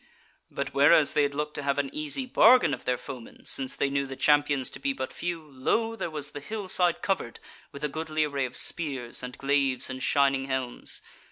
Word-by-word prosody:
But 140 0 -4
whereas 145 +1 +5
they - - +3
had 140 -1 0
looked 150 +1 -2
to - - -4
have 140 0 0
an 140 -1 -1
easy 155 - -2
bargain 250 - +6
of - - -6
their 125 0 +1
foemen, 125 -3 -10
since 135 -1 -1
they 140 - 0
knew 140 0 0
the 135 - -6
Champions 145 -2 +2
to - - -8
be 135 0 0
but 130 -1 -4
a - - -16
few, 170 -2 -4
lo! 155 - -1
there 200 - -3
was 150 -2 -3
the 145 - -6
hillside 185 -1 -1
covered 190 -12 -1 0.3
with 140 0 -10
a - - +2
goodly 155 +1 -2
array 140 -3 -1
of 125 0 -6
spears 135 -8 -1
and 125 0 -7
glaives 135 -2 +1
and 130 0 -6
shining 135 -1 +2
helms. 130 -2 -4
140 Hz, 210 wpm, -27 LUFS, 135-155 Hz, 0.3 s, bargain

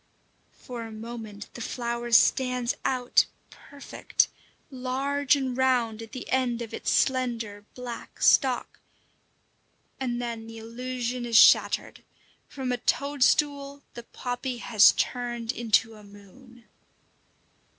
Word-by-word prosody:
For 245 -2 -8
a 225 -1 -7
moment 220 -2 -9
the 240 - -8
flower 235 0 -4
stands 250 +1 +3
out 250 -1 +2 0.2
perfect, 285 -1 -2 0.4
large 270 +2 0
and 265 -3 -2
round 245 -4 +1
at 225 -1 -10
the 255 - -7
end 245 -2 0
of 225 - -10
its - - -3
slender, 230 -6 0
black 245 -2 -8
stalk, 260 -3 +3 1.2
and 245 -2 -2
then 230 -2 -5
the 225 0 -10
illusion 245 +2 -4
is 235 -2 +2
shattered: - - +5 0.5
from 265 -3 -4
a 245 - 0
toadstool 280 +1 +1
the 240 - -8
poppy 245 +1 -5
has 220 -3 +5
turned 240 -2 -2
into 225 -2 +1
a 210 -1 -14
moon! 220 +5 -17
245 Hz, 120 wpm, -26 LUFS, 230-260 Hz, 1.2 s, shattered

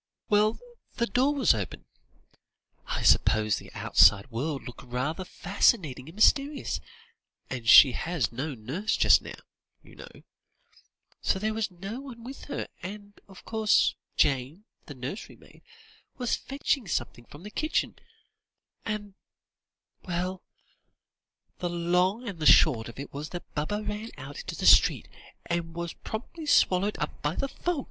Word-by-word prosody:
_" - - -65 0.3
"Well, 210 +1 +3 0.4
the 235 - +1
door 255 +7 +1
was 260 - +4
open; 100 -7 -5 1.0
I - - -3
suppose 110 -1 +4
the - - -11
outside 100 +8 +4
world 135 +5 -3
looked 125 - -10
rather 130 +8 -3
fascinating 170 - 0
and 165 - -13
mysterious, 280 +6 +2 0.7
and 120 -3 -3
she 135 +1 +10
has 160 -2 -2
no 135 +4 -4
nurse 140 - -2
just - - +5
now, - - -8 0.5
you - - -17
know; - - -13 1.0
so - - +1
there 215 +3 -1
was 220 -1 -1
no 195 +6 -7
one 245 -4 -10
with 265 +3 -9
her; 290 - -4
and, 205 +2 -8
of 195 -2 -15
course, 220 -2 +2 0.2
Jane, 140 +9 0 0.2
the 145 - -9
nursery 130 - -7
maid, - - -20 0.6
was 245 -2 0
fetching 275 -4 -2
something 120 -5 -3
from 145 +7 -14
the 210 - -9
kitchen 310 +6 -1 0.8
and 210 -2 -4 0.9
well, 180 +1 -3 1.2
the 175 - -2
long 180 +7 0
and 195 -5 -6
the 155 - +1
short 120 -7 +5
of 115 - -12
it 140 +1 -8
was 145 +2 -6
that 175 - -9
Baba 205 +9 -2
ran 210 +2 -5
out 140 +1 -8
into - - -6
the - - -4
street, - - +6 0.4
and 170 -1 -3
was 170 -1 -4
promptly 300 +8 -7
swallowed 200 -5 +3
up - - -5
by 150 +3 -1
the 275 - -1
fog." 345 +3 -3
180 Hz, 150 wpm, -27 LUFS, 140-215 Hz, 1.2 s, she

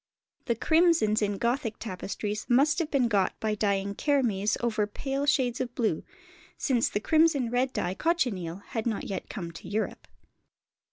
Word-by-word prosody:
The 235 - +1
crimsons 315 -7 +3
in 205 -1 0
Gothic 235 -1 -1
tapestries 210 +1 -4
must 280 +7 +4
have 325 -3 -1
been 265 -5 +2
got 200 -4 +1
by 215 -1 0
dyeing 200 -1 0
kermes 225 -7 +1
over 220 -3 0
pale 275 +6 -3
shades 255 -4 +2
of 245 -1 -4
blue, 220 -9 0 0.5
since 245 -5 +1
the - - -1
crimson 305 -2 +3
red 255 +1 +1
dye, 180 - -2
cochineal, 200 - -1
had 225 0 -2
not 220 -3 -1
yet 195 - -5
come 170 -6 -5
to 165 - -11
Europe. 215 +2 -3
230 Hz, 160 wpm, -28 LUFS, 205-270 Hz, 0.5 s, must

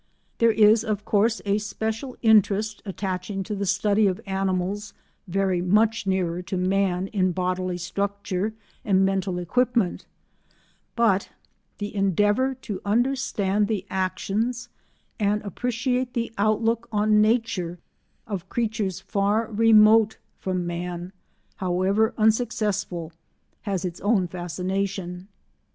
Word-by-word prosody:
There 230 - +5
is, 220 0 +5
of 210 -2 -3
course, 225 +2 +2
a 200 +1 +2
special 220 +4 -4
interest 215 -1 +3
attaching 195 0 -3
to 210 - -5
the 200 -1 -2
study 205 +2 +3
of 185 -1 -1
animals 195 +1 -2 0.3
very 190 -1 0
much 210 +3 +2
nearer 180 -2 0
to 185 +1 -4
man 185 0 +1
in 185 -3 +1
bodily 185 0 -1
structure 200 +3 -2 0.3
and 195 -2 +3
mental 190 -1 -1
equipment, 235 +2 0 0.9
but 215 -5 +2 0.5
the 205 0 -5
endeavour 205 +6 +2
to 195 -3 -4
understand 210 -3 +1
the 205 -3 -2
actions 200 +6 -2 0.5
and 210 0 +2
appreciate 245 +4 -2
the 235 -1 -1
outlook 225 +3 +1
on 210 0 +3
nature 215 -6 0 0.5
of 195 -5 -5
creatures 215 -5 -1
far 210 +3 0
remote 220 0 +5 0.2
from 185 -2 -2
man, 175 +1 -5 0.4
however 190 +4 +1
unsuccessful, 210 -6 0 0.5
has 195 -3 -2
its 175 -1 -5
own 205 -3 +2
fascination. 180 +1 -3
200 Hz, 115 wpm, -25 LUFS, 185-220 Hz, 0.9 s, There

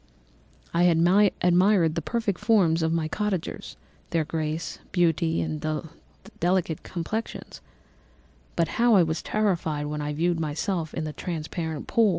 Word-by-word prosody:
"I 170 +1 +4
had 170 -2 +4 0.4
admired 180 -1 +4
the 165 - -2
perfect 210 0 -2
forms 180 -8 +3
of 160 0 +1
my 165 -1 0
cottagers—their 185 -3 -4
grace, 155 0 -3
beauty, 165 -2 +2
and 155 -1 -4 0.8
delicate 175 -2 +1
complexions; 190 +6 -5 0.9
but 170 -1 +2
how 235 -4 +6
was 160 0 -2
I - - -10
terrified 170 -8 0
when 150 0 -3
I 150 0 -2
viewed 170 +2 0
myself 160 +2 -2
in 160 - -2
a 155 - -5
transparent 160 -2 -4
pool! 225 -2 +3
165 Hz, 135 wpm, -26 LUFS, 160-185 Hz, 0.9 s, how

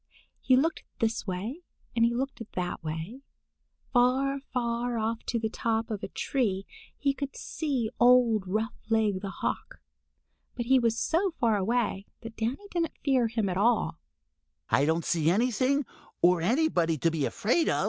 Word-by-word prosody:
He 260 - +4
looked 320 +5 +1
this 225 -1 -1
way 205 - -4 0.3
and 230 - +3
he 235 - +4
looked 265 0 -3
that 180 -2 -3
way. 160 - -5 0.7
Far, 265 +3 +3
far 240 -1 -1
off 225 +1 -1
on 235 - 0
the 220 - +1
top 225 +1 -1
of 205 -2 -3
a - - -4
tree 200 -8 -1 0.3
he 280 -1 +1
could 280 0 -5
see 265 -8 -2
old 240 -4 +5
Roughleg 220 -1 0
the 200 - -4
Hawk, - - -3 0.8
but 240 - -3
he 260 +2 +5
was 230 -2 +1
so 335 +7 +1
far 230 -3 +3
away 205 -1 0
that 225 -1 -9
Danny 250 - -3
didn't 335 -2 -1
fear 260 -4 +3
him 225 -2 -1
at 180 -1 -1
all. 230 - +2
230 Hz, 130 wpm, -28 LUFS, 215-260 Hz, 0.8 s, old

